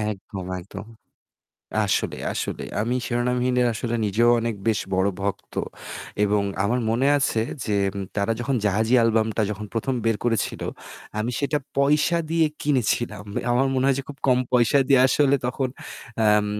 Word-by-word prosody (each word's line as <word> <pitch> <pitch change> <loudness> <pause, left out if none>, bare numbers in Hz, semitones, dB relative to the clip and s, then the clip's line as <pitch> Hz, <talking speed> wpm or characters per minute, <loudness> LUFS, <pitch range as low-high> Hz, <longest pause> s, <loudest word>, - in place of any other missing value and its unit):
একদম, 100 -3 -4
একদম। 100 +3 -9 1.0
আসলে, 95 - 0 0.2
আসলে। - - -3 0.2
আমি 115 +4 0
'Shironamhin' 125 +1 0 0.2
আসলে 115 +1 -3
নিজেও 110 +4 +3
অনেক 115 0 -1
বেশ 110 - +2
বড় 95 +1 +2
ভক্ত। 100 0 -4 0.7
এবং 105 0 +2 0.2
আমার 120 +5 +1
মনে 120 +4 +2
আছে 135 -5 +1 0.2
যে 105 -2 0 0.4
তারা 100 +2 +1
যখন 130 +3 -1
'জাহাজী' 110 +4 +3
অ্যালবামটা 110 -1 +2
যখন 105 0 -5
১ম, 125 +4 -1
বের 115 -1 +2
করেছিল, 115 -3 0 0.6
আমি 110 +3 -1
সেটা 145 +1 +1 0.2
পয়সা 150 +4 +3
দিয়ে 165 -1 +3 0.2
কিনেছিলাম। 120 -6 0 0.3
আমার 130 +3 +3
মনে 130 0 +1
হয় 135 -1 +3
যে - - -2
খুব 145 - -8
কম 125 -1 +5
পয়সা 125 +2 +4
দিয়ে 135 -2 +6
আসলে 140 0 +3
তখন 130 +1 -1 0.6
আম 105 0 +4
115 Hz, 150 wpm, -24 LUFS, 105-130 Hz, 1.0 s, দিয়ে